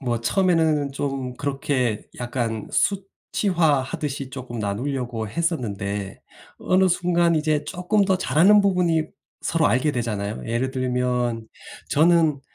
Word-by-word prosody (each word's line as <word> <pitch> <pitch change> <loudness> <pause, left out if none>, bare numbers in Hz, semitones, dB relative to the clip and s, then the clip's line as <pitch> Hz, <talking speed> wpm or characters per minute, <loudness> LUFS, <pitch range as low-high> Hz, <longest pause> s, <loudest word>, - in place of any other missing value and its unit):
뭐 120 -4 -1
처음에는 160 -3 +2
좀 135 -3 -3
그렇게 135 -5 -1 0.2
약간 120 -3 -3
수치화하듯이 155 -8 -1
쪼끔 125 -3 -7
나누려고 115 +1 -3
했었는데 105 - -3 0.4
어느 185 0 +3
순간 175 -1 +2
이제 155 -1 0
쪼끔 195 +3 0
더 190 -1 +1
잘하는 195 +5 +5
부분이 180 -5 +2 0.4
서로 165 -2 +1
알게 135 +4 +2
되잖아요. 105 -3 -3
예를 120 +3 -1
들면 125 -3 -1 0.4
저는 160 -2 +3
140 Hz, 270 characters per minute, -23 LUFS, 120-170 Hz, 0.4 s, 잘하는